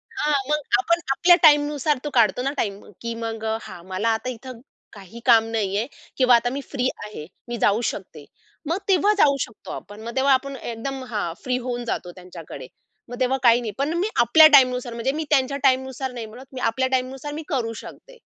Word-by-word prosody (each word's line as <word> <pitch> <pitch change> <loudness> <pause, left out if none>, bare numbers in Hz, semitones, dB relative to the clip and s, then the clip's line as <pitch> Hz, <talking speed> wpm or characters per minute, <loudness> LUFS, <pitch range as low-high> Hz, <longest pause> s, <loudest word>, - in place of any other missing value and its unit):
हां. 300 -7 +1
मग 300 0 +2 0.2
आपण 340 -2 +1
आपल्या 350 +5 +5
टाईमनुसार 295 -1 +4
तो 295 - -3
काढतो 230 -1 +3
ना 275 - 0
टाईम, 200 -1 -2 0.2
की 235 0 -4
मग 225 -1 -5
अ, 220 0 0
"हां, 170 - -11
मला 190 +5 -1
आता 255 - -6
इथे 255 +1 -8 0.4
काही 200 +3 -12
काम 225 -3 +6
नाहीये 210 0 -1 0.3
किंवा 255 -2 +5
आता 240 +1 +1
मी 275 +2 -4
फ्री 255 -2 0 0.2
आहे. 210 -8 -8 0.2
मी 240 0 -4
जाऊ 210 +3 +3
शकते." 160 -7 -10 0.4
मग 340 - +1
तेव्हा 395 +2 +3
जाऊ 280 -6 +5
शकतो 215 - -6
आपण. 205 +1 -9
मग 235 +2 -7
तेव्हा 270 +1 +4
आपण 275 +1 -1
एकदम, 260 +2 -5
हां, 205 -7 -2
फ्री 250 -1 0
होऊन 245 -1 -3
जातो 180 -5 -4
त्यांच्याकडे. 170 -7 -10 0.4
मग 245 +1 -8
तेव्हा 260 +1 +1
काही 235 0 +5
नाही. 220 -3 -4
पण 285 +4 -1
मी 385 +5 0
आपल्या 310 +7 +8
टाईमनुसार 250 -2 +4
म्हणजे 235 +3 -1
मी 315 +3 -3
त्यांच्या 275 -1 +2
टाईमनुसार 265 0 +1
नाही 240 -3 -6
बोलत. 245 +5 -12
मी 255 - -6
आपल्या 260 +2 0
टाईमनुसार 265 +3 -6
मी 310 +1 -6
करू 235 -6 -1
शकते. - - -13
250 Hz, 200 wpm, -23 LUFS, 225-275 Hz, 0.4 s, आपल्या